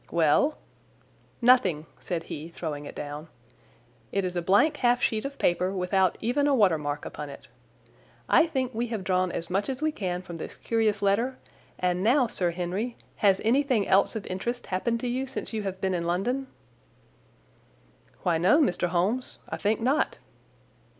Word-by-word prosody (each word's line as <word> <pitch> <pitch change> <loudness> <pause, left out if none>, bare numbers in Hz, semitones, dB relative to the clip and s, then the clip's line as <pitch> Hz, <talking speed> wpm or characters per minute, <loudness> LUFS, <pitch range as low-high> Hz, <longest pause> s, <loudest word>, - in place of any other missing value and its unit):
"Well?" 170 - +3 0.9
"Nothing," 195 -11 +4
said 170 -3 -3
he, 155 0 -7
throwing 155 -4 -5
it - - -9
down. 150 +2 -6 0.8
"It 195 -1 0
is 180 0 -3
a 175 - 0
blank 230 - +3
half 245 -1 +3
sheet 220 -1 0
of 275 0 -5
paper, 180 +2 +1
without 190 -1 +1
even 265 +6 +1
a 285 - +4
water 190 -9 +4
mark 145 0 -3
upon 150 -1 -6
it. 140 - -12 0.8
I 335 - +5
think 260 -5 -2
we 235 +2 -1
have 220 -4 -4
drawn 185 -1 +1
as 165 +1 -5
much 195 +5 0
as 260 - -3
we 310 +1 +1
can 185 -9 -3
from 170 -2 -8
this - - -7
curious 220 -3 0
letter; 230 +7 +1 0.4
and 180 0 0
now, 250 +4 +4
Sir 185 -6 -1
Henry, 185 +7 -3 0.2
has 195 -2 +4
anything 255 -3 +2
else 195 +4 +3
of 215 - -4
interest 235 +7 -3
happened 230 +6 -1
to 250 - -2
you 255 +2 -1
since 265 -2 -5
you 220 - -1
have 190 -2 -4
been 190 -1 0
in 170 -1 -1
London?" 245 +10 -1 1.8
"Why, 170 -3 +2
no, 190 - +5
Mr. 180 - +2
Holmes. 190 +9 0
I - - -3
think 210 +2 0
not." 270 +6 +1
195 Hz, 175 wpm, -27 LUFS, 175-245 Hz, 1.8 s, I